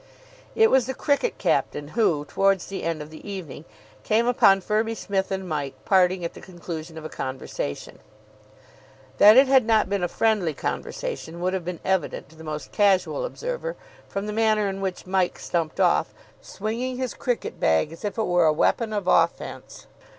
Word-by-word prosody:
It 445 0 +5
was 260 -2 +4
the 265 - -3
cricket 290 - 0
captain 145 0 0
who, 165 -8 +1
towards 195 +3 +1
the 195 - -6
end 165 -2 -2
of 150 - -13
the 155 - -11
evening, 170 -6 -7 0.4
came 225 - +2
upon 220 -5 +5
Firby 220 +3 0
Smith 195 -3 -2
and 190 -1 -3
Mike 145 -4 -3
parting 185 -2 +3
at 170 - -4
the - - -12
conclusion 170 -3 -8
of 155 - -8
a - - -2
conversation. 130 - -5 1.2
That 210 +3 +9
it 270 +1 +7
had 265 -1 +5
not 220 -3 +2
been 200 -1 0
a 175 - +1
friendly 200 -7 +1
conversation - - -4
would 185 +1 -1
have 190 -2 -2
been 180 -1 -4
evident 190 -6 -1
to 160 - -18
the 160 - -12
most 155 -1 -6
casual 205 - +2
observer - - -4 0.3
from 195 +1 -3
the 210 - -4
manner 215 -1 +2
in 195 0 -4
which 190 -2 -4
Mike 185 -1 0
stumped 165 -2 -3
off, - - +2 0.3
swinging 235 +5 -4
his 255 -1 -3
cricket 245 -2 -3
bag 80 - +2
as 165 - -12
if 205 +1 -3
it 220 - +1
were 175 -2 +3
a - - +5
weapon 215 +8 +1
of 205 -3 -2
offence. 170 -2 0
195 Hz, 185 wpm, -24 LUFS, 165-225 Hz, 1.2 s, That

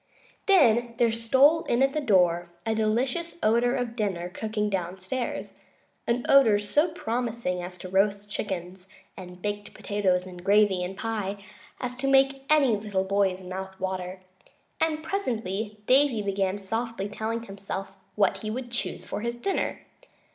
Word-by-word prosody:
Then 240 - +4
there 235 -2 +3
stole 265 +8 +4
in 240 +3 +2
at 270 0 +2
the 305 - 0
door 175 -7 +3 0.2
a 225 - +1
delicious 245 +11 0
odor 235 +3 +3
of 245 -3 -2
dinner 190 -6 -2
cooking 210 +2 -2
downstairs, 190 +5 -4 0.5
an 240 +1 0
odor 255 -7 +6
so 295 +11 +1
promising 235 - -2
as 180 +1 -7
to 185 - -8
roast 200 +2 +1
chickens 190 -2 -5 0.3
and 180 -1 -11
baked 205 0 -4
potatoes 190 -3 0
and 180 -1 -10
gravy 200 -2 +4
and 190 +2 -5
pie 205 -3 -3 0.4
as 250 0 -4
to 275 - -2
make 270 0 +3
any 285 -7 +5
little 205 -2 -1
boy's 190 -1 +1
mouth 190 +1 -7
water; 185 0 -4 0.6
and 315 -1 0
presently 220 - -2
Davy 260 -4 +4
began 195 -1 0
softly 225 +1 -3
telling 220 +2 -3
himself 195 -1 -6 0.2
what 200 -2 +2
he 215 +2 -5
would 245 +2 -5
choose 240 - -3
for - - -4
his 235 +1 -2
dinner. 390 +11 -1
210 Hz, 150 wpm, -27 LUFS, 190-245 Hz, 0.6 s, odor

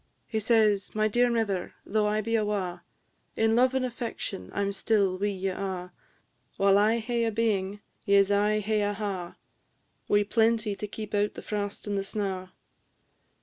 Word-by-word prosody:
He 220 - -2
says, 215 -3 +2
"My 215 0 +3
dear 240 +3 +3
mither, 215 -6 -1
though 210 0 +1
I 210 +1 +1
be 230 +2 -1
awa', 200 -5 -1 0.5
In 225 0 +2
love 255 +2 +4
and 260 -1 +1
affection 235 - -5
I 200 - -2
'm 200 0 0
still 200 -2 +1
wi' 205 - +1
ye 195 -1 -2
a'; 185 -1 -4 0.7
While 195 0 +5
I 220 +3 +3
hae 235 +1 -1
a 225 - +1
being 205 -3 0 0.3
ye 200 0 +5
'se 200 0 +4
aye 210 +1 +3
hae 215 +1 0
a 205 0 0
ha', 195 -4 -4 0.7
Wi' 205 0 +4
plenty 220 0 +2
to 210 - -5
keep 210 0 -7
out 205 0 +1
the - - -8
frost 205 -1 -3
and 205 -1 -1
the - - -2
snaw." 195 -2 -3
210 Hz, 180 wpm, -28 LUFS, 195-220 Hz, 0.7 s, While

